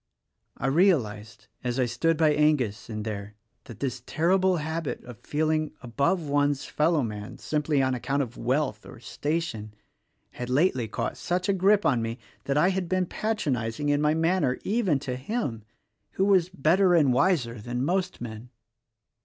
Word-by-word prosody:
I - - -4
realized 130 - +1
— - - -41
as 125 +1 -1
I 130 - +3
stood 155 +7 0
by 155 -1 +4
Angus, 145 -10 +1
in 110 -1 -4
there, 105 -1 -5
— - - -48
that 115 -2 -11
this 130 -2 -2
ter 160 +6 -1
rible 185 -2 +3
habit 160 0 -3
of 120 -4 -11
feeling 155 0 -1
above 140 +9 0
one's 145 -1 +1
fellowman 125 -10 -1
(simply 150 -2 0
on 130 0 +1
account 135 +3 0
of 120 -2 -8
wealth 130 -3 -1
or - - -12
station) 120 -7 -3 0.6
had 125 0 -6
lately 130 -3 +2
caught 110 - -3
such 180 +1 -1
a - - +4
grip 200 +2 +3
on 125 -4 +3
me 115 +1 -3 0.3
that 140 +1 0
I 170 +5 +4
had 185 -2 -2
been 185 0 +1
patronizing 145 - -2
in 145 0 +2
my 150 +1 +3
manner 165 -5 +1
even 200 -8 +1
to 125 - -3
him, 130 - -3 0.5
who 190 - +1
was 185 -3 +4
better 180 +3 +3
and 145 -6 +4
wiser 125 - +1
than 120 +3 -2
most 185 +2 -1
men. 115 0 -8
145 Hz, 170 wpm, -27 LUFS, 120-170 Hz, 0.6 s, by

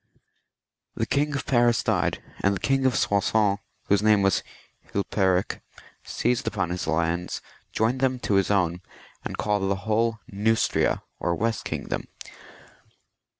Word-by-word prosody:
The - - 0
King 145 +1 0
of 140 - -3
Paris 120 -2 +3
died, - - 0 0.2
and 100 +1 +2
the - - -4
King 135 +7 +2
of 125 - +1
Soissons, 100 0 +2 0.2
whose 100 0 +2
name 105 -2 +4
was 95 -2 +3 0.5
Hilperik, 95 -2 0 0.4
seized 120 +1 -1
upon 95 -5 -1
his 90 -2 -3
lands, 85 +2 0 0.3
joined 115 +4 +1
them 130 -1 +1
to - - -1
his 95 -1 +3
own, 90 -3 +1 0.4
and - - -5
called 100 -2 0
the 100 - +2
whole 115 +1 +1
Neustria, 110 +3 +1 0.2
or 85 - 0
west 115 +4 -1
kingdom. - - -3
105 Hz, 140 wpm, -25 LUFS, 95-115 Hz, 0.5 s, name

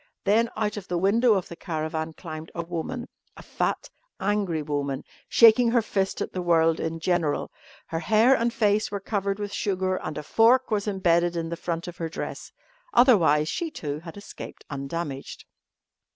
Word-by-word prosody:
Then 225 +3 +3
out 210 -1 -1
of 195 - -7
the 175 - -1
window 215 +5 +4
of 190 - -2
the 170 - -9
caravan 160 -2 -3
climbed 155 -1 -8
a 170 - -2
woman 175 +9 -4 0.3
a - - -11
fat, - - -2 0.3
angry 195 -5 0
woman, 145 -2 -2 0.3
shaking 230 +1 +6
her 235 0 +3
fist 195 -2 -1
at - - -3
the 185 - -2
world 165 -2 +3
in 160 0 -3
general. 170 -3 0 0.3
Her 165 - -3
hair 220 +7 +4
and 235 -1 +1
face 215 -2 +1
were 200 - -3
covered 200 -1 -2
with 205 -1 -5
sugar 185 -2 0
and 155 -4 -5
a 150 - -4
fork 240 - +4
was 210 -1 0
embedded 175 -3 +2
in 165 -1 -2
the 170 - -3
front 170 0 -4
of 175 - -8
her 165 -1 -3
dress. - - -6 0.4
Otherwise 165 - +5
she, 340 - -2
too, 150 - -5
had 165 +3 -10
escaped 205 - -10
undamaged. 140 0 -5
180 Hz, 180 wpm, -26 LUFS, 160-210 Hz, 0.4 s, shaking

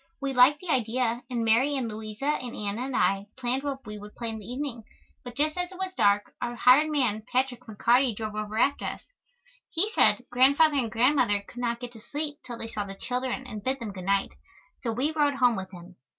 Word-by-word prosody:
We 275 -1 -2
liked 260 +4 +6
the 365 - -9
idea 240 -1 0
and 235 -2 -1
Mary 250 +6 +3
and 260 -4 -1
Louisa 215 +3 -6 0.2
and 245 -2 -6
Anna 210 +4 -3
and 270 - -4
I 195 +2 +2
planned 255 +1 -1
what 275 -2 -4
we 210 0 -7
would 210 +1 -11
play 235 -1 -4
in 220 -1 -5
the 205 - -11
evening, 255 -3 -4 0.4
but 245 -1 -9
just 305 +3 +1
as 360 +1 -2
it 370 - -10
was 380 0 -3
dark 205 - +2
our 240 0 -2
hired 260 +6 +5
man, 250 -8 +1
Patrick 255 -1 0
McCarty, 235 +3 +2
drove 215 0 -4
over 215 0 -4
after 280 +5 +2
us. - - -5 0.7
He 385 +6 0
said 250 - +3
Grandfather 280 +4 +5
and 240 -4 0
Grandmother 235 -4 +3
could 245 - -10
not 235 -1 -1
get 245 -1 -7
to 225 -2 -13
sleep 290 +4 -4
till 240 -2 -7
they 225 - -5
saw 210 -2 -3
the 195 -1 -8
children 255 +4 -3
and 215 -5 -7
bid 265 +1 -1
them 220 -4 -5
good 185 -2 -8
night. 195 0 +1 0.5
So 235 - -1
we 260 +7 0
rode 295 -2 +2
home 250 -3 +4
with 190 -2 -5
him. 180 0 -13
245 Hz, 225 wpm, -27 LUFS, 215-270 Hz, 0.7 s, liked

